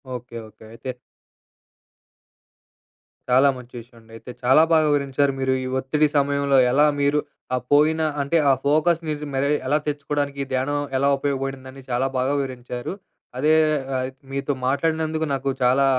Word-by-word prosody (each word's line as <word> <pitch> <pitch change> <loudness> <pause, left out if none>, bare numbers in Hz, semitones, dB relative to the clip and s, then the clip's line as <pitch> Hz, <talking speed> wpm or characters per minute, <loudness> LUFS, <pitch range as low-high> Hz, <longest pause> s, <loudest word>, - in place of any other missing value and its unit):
Okay. 120 -1 -9
Okay. 110 +1 -18
అయితే 130 - -8 2.4
చాలా 130 +3 +5
మంచి 125 -1 -13
విషయం 120 +1 -16
అండి. 115 0 -21
అయితే 115 +3 -10
చాలా 130 +5 +6
బాగా 160 -1 +5
వివరించారు 140 -1 +1
మీరు, 130 0 +1
ఈ - - -4
ఒత్తిడి 150 +3 +1
సమయంలో 140 -1 +2
ఎలా 145 +3 +4 0.2
మీరు 145 +1 +2 0.4
ఆ - - +1
పోయిన 155 +2 +4 0.2
అంటే 140 +4 +1
ఆ - - +6
ఫోకస్‌ని 155 +2 +2
రీ 150 - -6
మరి 140 +2 +1 0.2
ఎలా 145 +3 +3
తెచ్చుకోవడానికి 145 -1 -2
ధ్యానం 140 +3 0 0.2
ఎలా 140 +1 +2
ఉపయోగపడిందని 135 -1 -4
చాలా 125 +2 0
బాగా 130 +3 +1
వివరించారు. 125 0 -5 0.5
అదే 155 +3 +3 0.4
ఆహ్, 130 0 -1 0.2
మీతో 140 +1 -2
మాట్లాడినందుకు 160 +3 0
నాకు 135 0 -2
చాలా 130 +2 +4
140 Hz, 145 wpm, -23 LUFS, 130-145 Hz, 2.4 s, చాలా